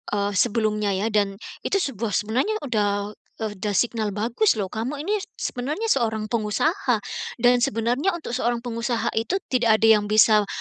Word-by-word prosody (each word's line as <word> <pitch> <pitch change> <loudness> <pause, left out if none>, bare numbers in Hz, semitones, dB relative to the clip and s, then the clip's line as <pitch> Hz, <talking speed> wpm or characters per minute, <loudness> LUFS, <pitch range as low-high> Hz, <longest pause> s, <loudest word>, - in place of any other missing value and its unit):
eee, 200 0 0
sebelumnya 210 -1 +1
ya. 210 +4 -1
Dan 200 -2 +1 0.2
itu - - -2
sebuah 230 - -1
sebenarnya 245 - 0
udah 205 -4 0 0.3
udah 205 -1 -3
signal 220 -2 0
bagus 235 - +2
loh. 195 -3 -3
Kamu 235 +7 -3
ini 420 +4 0 0.2
sebenarnya 300 - -3
seorang 220 -4 0
pengusaha 240 - +1 0.5
dan 245 0 +5
sebenarnya 245 - 0
untuk 330 - -7
seorang 240 -1 -1
pengusaha 230 0 -2
itu 230 +12 0 0.2
tidak 235 -4 +4
ada 225 - +5
yang 205 - -5
bisa 215 -1 +5
225 Hz, 155 wpm, -24 LUFS, 210-250 Hz, 0.5 s, dan